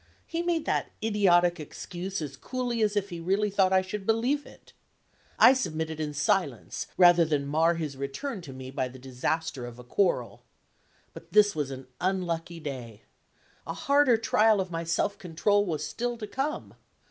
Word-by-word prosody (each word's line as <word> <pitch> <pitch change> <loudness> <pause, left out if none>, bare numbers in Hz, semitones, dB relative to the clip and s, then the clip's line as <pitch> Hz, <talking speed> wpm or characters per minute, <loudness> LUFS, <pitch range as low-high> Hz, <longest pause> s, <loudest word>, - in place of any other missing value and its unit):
He 335 - -3
made 345 -2 0
that - - 0
idiotic 180 -5 +3
excuse 180 +4 -5
as 140 -2 -6
coolly 245 - -3
as 210 -1 +2
if 205 -1 0
he 170 - -5
really 195 +5 0
thought 190 -1 +3
I 190 0 +4
should 195 +2 -5
believe 245 +6 +1
it. - - -17 0.6
I 255 - +8
submitted 160 - -3
in 150 -1 -3
silence, 165 - -1
rather 175 -2 +7
than 150 -3 0
mar 160 +4 +2
his 155 -4 -4
return 140 - -4
to 155 -6 -9
me 130 0 -8
by 130 -2 -1
the 130 +1 -11
disaster 130 +1 -3
of 120 0 -10
a 125 - -11
quarrel. 180 +10 0 0.7
But - - -13
this 205 -2 +5
was 145 -3 -1
an 135 -1 -7
unlucky 175 -3 -2
day. 125 -8 -7 0.6
A - - -4
harder 280 -4 +4
trial 220 -1 +3
of 185 -2 -2
my 165 0 -3
self 200 +4 0
control 200 +4 +1
was 155 -3 -2
still 240 0 -3
to 220 - -5
come. 270 +8 -3
175 Hz, 175 wpm, -28 LUFS, 150-210 Hz, 0.7 s, I